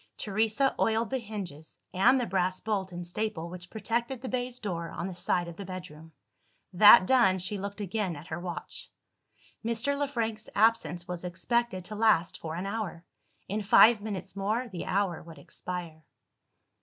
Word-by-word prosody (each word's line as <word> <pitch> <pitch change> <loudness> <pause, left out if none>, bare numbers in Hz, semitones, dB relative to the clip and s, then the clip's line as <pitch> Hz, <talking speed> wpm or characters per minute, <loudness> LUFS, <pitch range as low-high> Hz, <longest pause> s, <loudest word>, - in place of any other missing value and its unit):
Teresa 220 +6 +1
oiled 225 +1 +1
the 265 - 0
hinges, 195 - -7 0.2
and 240 +8 +5
the 245 - 0
brass 185 -1 0
bolt 200 -3 -2
and 175 0 -6
staple 175 -2 -3
which 180 -1 -9
protected 235 +4 -2
the 255 +1 -6
baize 250 -1 -2
door 170 -7 -4
on 170 - -5
the 190 - -4
side 175 0 0
of 170 -1 -9
the 200 - -6
bedroom. 165 -4 -9 0.6
That 205 +1 +9
done, 235 -6 +4
she 190 +3 -2
looked 200 +2 -6
again 195 -2 -2
at 145 +2 -10
her 165 -1 -5
watch. 175 -3 -6 0.7
Mr. 235 +5 0
Le 285 0 0
Frank's 225 -4 -3
absence 200 -6 +2
was 180 -1 -5
expected 185 +2 -1
to 215 - -6
last 205 -6 +2
for 160 -1 -5
an 180 +3 -4
hour. 195 -5 -4 0.4
In 210 +3 -2
five 220 +2 +6
minutes 200 -2 -5
more, 215 +6 -1
the 185 -6 -6
hour 190 -3 0
would 165 -2 -12
expire. 165 +2 -7
195 Hz, 170 wpm, -29 LUFS, 175-225 Hz, 0.7 s, That